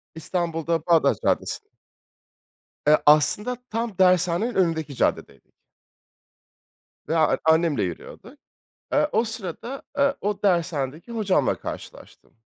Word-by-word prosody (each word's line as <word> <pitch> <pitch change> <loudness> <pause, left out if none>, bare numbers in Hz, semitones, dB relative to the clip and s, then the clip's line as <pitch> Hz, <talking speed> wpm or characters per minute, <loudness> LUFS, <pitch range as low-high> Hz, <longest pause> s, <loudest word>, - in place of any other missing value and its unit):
İstanbul'da 165 -1 -2
Bağdat 170 -2 +3
Caddesi. 420 - -1 1.2
Eee, 150 +1 +6
aslında 175 +11 +4
tam 225 -3 -3
dershanenin 185 +4 +2
önündeki 165 -5 0
caddedeydik. - - -2 1.6
Ve 165 - 0
a 160 -1 +3
annemle 160 -5 +3
yürüyorduk. 200 - -7 0.6
Eee, 295 +1 +2
o 225 - +2
sırada, 225 +3 -6
eee 280 0 +2
o 205 0 -2
dershanedeki 165 - -1
hocamla 215 -5 +1
karşılaştım. - - -10
180 Hz, 100 wpm, -24 LUFS, 160-225 Hz, 1.6 s, Eee